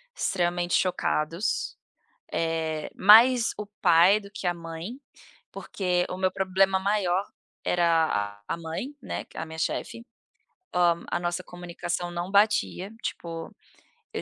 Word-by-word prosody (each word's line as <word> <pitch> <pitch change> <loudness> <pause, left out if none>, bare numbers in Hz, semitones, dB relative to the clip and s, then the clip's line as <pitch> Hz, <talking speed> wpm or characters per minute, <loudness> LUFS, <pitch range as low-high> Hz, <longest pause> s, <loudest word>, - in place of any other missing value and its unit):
extremamente 175 -1 0
chocados. 170 0 0 0.6
Eh, 160 -2 -2
mais 230 +4 +7
o 210 - -4 0.2
pai 180 +3 +6
do 200 -1 -13
que 205 -2 -6
a 175 - +1
mãe, 170 +9 -7 0.5
porque 180 -2 -1
o 180 - -4
meu 185 0 +1
problema 190 0 +2
maior 195 -1 +1 0.4
era 160 -13 +1
a - - -2
mãe, 170 - -5
né, - - -5
que - - -17
é - - -3
a - - -4
minha 160 0 -8
chefe. 230 +7 -3 0.7
Hã, 170 -1 +2
a - - 0
nossa 175 +1 -2
comunicação 175 0 -5
não 175 +1 -4
batia, 200 -1 +2
tipo, 165 -1 -5 0.6
eu - - -3
175 Hz, 135 wpm, -26 LUFS, 165-195 Hz, 0.7 s, mais